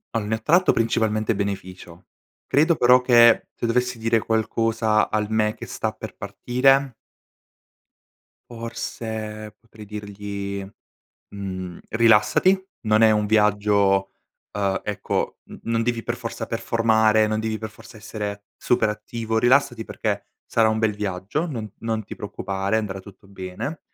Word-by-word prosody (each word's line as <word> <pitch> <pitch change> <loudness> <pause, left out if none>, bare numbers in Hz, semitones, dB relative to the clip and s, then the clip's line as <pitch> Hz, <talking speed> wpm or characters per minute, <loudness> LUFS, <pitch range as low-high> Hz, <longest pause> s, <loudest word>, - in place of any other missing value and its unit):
Al 110 -2 0
ne 110 +1 -2
tratto 175 +9 +4
principalmente 110 -1 +1
beneficio. 95 -3 -5 0.4
Credo, 160 +4 +3
però, 125 -2 +6
che 120 -2 +5
se 120 - -3
dovessi 125 0 0
dire 115 +1 +2
qualcosa 110 0 +1
al 105 -1 -1
me 110 -1 +1
che - - -9
sta - - -2
per - - -9
partire 135 +2 +2 1.6
forse, 110 -2 -6
potrei 110 -1 -14
dirgli, 100 -1 -6 0.7
mhmm: 95 -3 -6
“Rilassati. 115 - +4 0.2
Non 110 0 +3
è 110 - +7
un 105 -1 +2
viaggio, 105 -2 +2 0.4
uhm, 100 -2 0
ecco 105 -1 -2
n - - -11
non 115 0 0
devi 120 -1 -1
per 120 - -2
forza 115 -1 -5
performare, 110 -1 +2
non 110 0 -1
devi 110 -1 -2
per 110 -1 -6
forza 115 +1 -15
essere 105 -1 -6
super 120 - +1
attivo. 110 +1 -3
Rilassati 120 -1 +3
perché - - -3 0.2
sarà 115 -1 +3
un 110 0 0
bel 110 -1 +1
viaggio, 105 - -3
non 115 -7 -5
non 110 -1 -2
ti - - -8
preoccupare, 100 -1 -3
andrà 100 -3 -3
tutto 100 +1 -16
bene. 95 - -6
110 Hz, 140 wpm, -23 LUFS, 105-115 Hz, 1.6 s, è